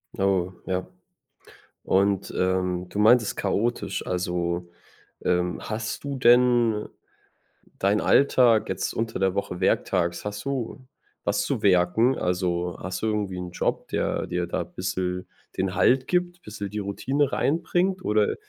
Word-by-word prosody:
Oh 95 Hz, -2 st, +1 dB
ja. 95 Hz, 0 st, -2 dB, 1.0 s
Und, 100 Hz, 0 st, +1 dB
ähm, 90 Hz, -1 st, 0 dB
du 100 Hz, -, -4 dB
meintest 110 Hz, +1 st, +4 dB
chaotisch. 110 Hz, +4 st, -1 dB
Also, 90 Hz, -1 st, -2 dB, 0.6 s
ähm, 90 Hz, 0 st, +1 dB
hast 110 Hz, +4 st, -4 dB
du 140 Hz, -1 st, -3 dB
denn 120 Hz, -3 st, +4 dB, 0.9 s
deinen 100 Hz, +2 st, +2 dB
Alltag 125 Hz, -5 st, +4 dB
jetzt 95 Hz, 0 st, -2 dB
unter 115 Hz, -2 st, -2 dB
der 95 Hz, -1 st, +1 dB
Woche, 90 Hz, -3 st, -3 dB
werktags, 85 Hz, -2 st, +1 dB
hast 105 Hz, +2 st, -5 dB
du 130 Hz, -1 st, -4 dB, 0.4 s
was -, -, +1 dB
zu -, -, -2 dB
werken? 100 Hz, +7 st, +3 dB
Also, 90 Hz, -1 st, -1 dB
hast 95 Hz, 0 st, -5 dB
du 110 Hz, -, 0 dB
irgendwie 105 Hz, -4 st, -2 dB
'nen 90 Hz, -1 st, -6 dB
Job, -, -, -2 dB
der -, -, -1 dB
dir 90 Hz, 0 st, -2 dB
da 85 Hz, -, -2 dB
bissel 90 Hz, +1 st, -3 dB, 0.3 s
den 95 Hz, 0 st, -1 dB
Halt 130 Hz, +1 st, +3 dB
gibt, 175 Hz, -1 st, 0 dB
bissel 105 Hz, -1 st, -6 dB
die 105 Hz, -, -4 dB
Routine 135 Hz, +8 st, -1 dB
reinbringt, 175 Hz, +5 st, 0 dB
oder 105 Hz, 0 st, +2 dB
100 Hz, 135 wpm, -25 LUFS, 90-120 Hz, 1.0 s, meintest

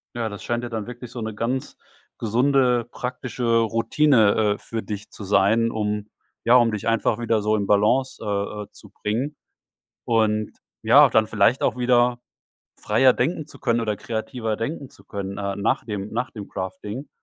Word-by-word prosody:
Ja, 115 Hz, -1 st, -1 dB
das 100 Hz, -2 st, -7 dB
scheint 120 Hz, 0 st, -2 dB
ja 120 Hz, -, -4 dB
dann 110 Hz, -1 st, -4 dB
wirklich 125 Hz, -1 st, -9 dB
so 125 Hz, -, -7 dB
'ne 110 Hz, -1 st, -4 dB
ganz 125 Hz, +4 st, -3 dB, 0.4 s
gesunde, 125 Hz, +1 st, +2 dB
praktische 125 Hz, -1 st, -5 dB
Routine, 115 Hz, -2 st, +3 dB
äh, -, -, -11 dB
für 115 Hz, -1 st, -5 dB
dich 105 Hz, 0 st, -6 dB
zu 105 Hz, -, -10 dB
sein, 110 Hz, +4 st, +3 dB
um 105 Hz, -1 st, -2 dB, 0.4 s
ja, 120 Hz, -, +6 dB
um 120 Hz, -2 st, +5 dB
dich 105 Hz, +1 st, -4 dB
einfach 115 Hz, 0 st, +1 dB
wieder 115 Hz, -2 st, +1 dB
so 105 Hz, +1 st, +2 dB
in 100 Hz, -2 st, -1 dB
Balance, 110 Hz, +6 st, +2 dB
äh, 105 Hz, 0 st, -2 dB
äh, 100 Hz, -, -16 dB
zu 105 Hz, -, -16 dB
bringen. 120 Hz, +9 st, -3 dB, 0.7 s
Und 110 Hz, -2 st, +1 dB, 0.3 s
ja, -, -, +7 dB
dann 110 Hz, -1 st, +3 dB
vielleicht 110 Hz, +4 st, +2 dB
auch 120 Hz, -, +1 dB
wieder 120 Hz, 0 st, +3 dB, 0.6 s
freier 125 Hz, +5 st, +4 dB
denken 155 Hz, +3 st, -1 dB
zu -, -, -15 dB
können 115 Hz, 0 st, +1 dB
oder 105 Hz, -2 st, -1 dB
kreativer 115 Hz, 0 st, -3 dB
denken 135 Hz, +4 st, -4 dB
zu -, -, -20 dB
können, 100 Hz, -1 st, -6 dB
äh, 100 Hz, -1 st, -3 dB
nach 100 Hz, +2 st, 0 dB
dem 105 Hz, -2 st, -5 dB
nach 120 Hz, +3 st, -2 dB
dem 105 Hz, -3 st, -8 dB
Crafting. 105 Hz, +7 st, -6 dB
115 Hz, 180 wpm, -23 LUFS, 105-125 Hz, 0.7 s, ja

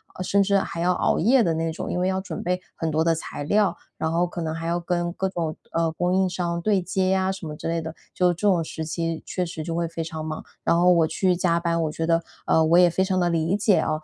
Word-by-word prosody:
呃， 185 Hz, -, -4 dB
甚 200 Hz, +2 st, +2 dB
至 200 Hz, 0 st, +3 dB
还 170 Hz, -, -5 dB
要 180 Hz, +2 st, +2 dB
熬 -, -, +1 dB
夜 240 Hz, +6 st, +4 dB
的 170 Hz, -, +1 dB
那 165 Hz, 0 st, -1 dB
种， -, -, -5 dB
因 180 Hz, -, -1 dB
为 180 Hz, -, +1 dB
要 190 Hz, 0 st, 0 dB
准 190 Hz, -, -6 dB
备 180 Hz, +1 st, -1 dB
很 165 Hz, -2 st, -2 dB
多 155 Hz, +1 st, +1 dB
的 165 Hz, 0 st, +3 dB
材 160 Hz, -2 st, -5 dB
料， 200 Hz, +3 st, +2 dB, 0.2 s
然 160 Hz, -, -1 dB
后 170 Hz, +2 st, +2 dB
可 175 Hz, 0 st, -6 dB
能 160 Hz, -1 st, -2 dB
还 165 Hz, -, -5 dB
要 170 Hz, +1 st, 0 dB
跟 175 Hz, 0 st, -1 dB
各 190 Hz, +2 st, -2 dB
种， 170 Hz, -4 st, -3 dB, 0.2 s
呃， 165 Hz, -1 st, +1 dB
供 175 Hz, +3 st, 0 dB
应 190 Hz, 0 st, +2 dB
商 170 Hz, -1 st, -2 dB
对 200 Hz, +1 st, +2 dB
接 185 Hz, +1 st, 0 dB
啊， 190 Hz, 0 st, +1 dB
什 190 Hz, -2 st, -8 dB
么 155 Hz, -, -5 dB
之 150 Hz, -, -6 dB
类 165 Hz, 0 st, -1 dB
的。 160 Hz, 0 st, -6 dB, 0.2 s
就 180 Hz, -1 st, +3 dB
这 180 Hz, +5 st, -1 dB
种 180 Hz, -4 st, +3 dB
时 160 Hz, 0 st, -5 dB
期 165 Hz, 0 st, -3 dB
确 180 Hz, -, -2 dB
实 165 Hz, -2 st, -6 dB
就 165 Hz, +1 st, -4 dB
会 170 Hz, 0 st, 0 dB
非 170 Hz, 0 st, -5 dB
常 160 Hz, -1 st, -5 dB
忙。 155 Hz, 0 st, -4 dB, 0.2 s
然 170 Hz, -, +3 dB
后 180 Hz, +1 st, +5 dB
我 165 Hz, -2 st, +4 dB
去 180 Hz, +3 st, +1 dB
加 170 Hz, -1 st, +1 dB
班 170 Hz, -1 st, 0 dB
我 155 Hz, -, -1 dB
觉 165 Hz, +1 st, -3 dB
得， 165 Hz, 0 st, +2 dB, 0.2 s
呃， 160 Hz, -, +4 dB
我 165 Hz, +2 st, +4 dB
也 180 Hz, -1 st, +7 dB
非 185 Hz, +3 st, +1 dB
常 190 Hz, -1 st, 0 dB
地 175 Hz, -, +2 dB
理 165 Hz, +3 st, +1 dB
解 205 Hz, -1 st, +3 dB
啊。 -, -, 0 dB
170 Hz, 305 characters per minute, -24 LUFS, 165-185 Hz, 0.2 s, 也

